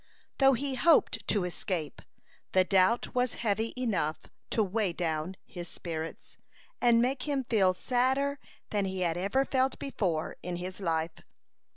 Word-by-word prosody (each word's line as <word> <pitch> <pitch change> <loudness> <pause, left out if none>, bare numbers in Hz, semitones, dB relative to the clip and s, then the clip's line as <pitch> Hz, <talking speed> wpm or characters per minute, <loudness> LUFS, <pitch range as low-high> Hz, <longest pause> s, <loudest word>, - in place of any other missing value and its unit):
Though 270 -1 +6
he 270 +2 -1
hoped 330 +5 +3
to 205 -4 +2
escape, 175 -4 -3 0.5
the 185 - +6
doubt 190 +5 +3
was 250 -1 +1
heavy 220 0 0
enough 195 -11 -1 0.3
to 220 - +2
weigh 200 -2 0
down 165 +1 -2
his 175 -1 -7
spirits, 165 -1 -6 0.4
and 235 -1 +5
make 260 +2 -1
him 280 -2 0
feel 195 -6 +3
sadder 265 +5 +1 0.3
than 205 -2 +1
he 190 -1 -3
had 170 -2 +1
ever 200 +10 +1
felt 265 0 +1
before 180 - -2
in 180 0 -4
his 180 +2 -6
life. 165 -3 -1
200 Hz, 150 wpm, -30 LUFS, 175-250 Hz, 0.5 s, Though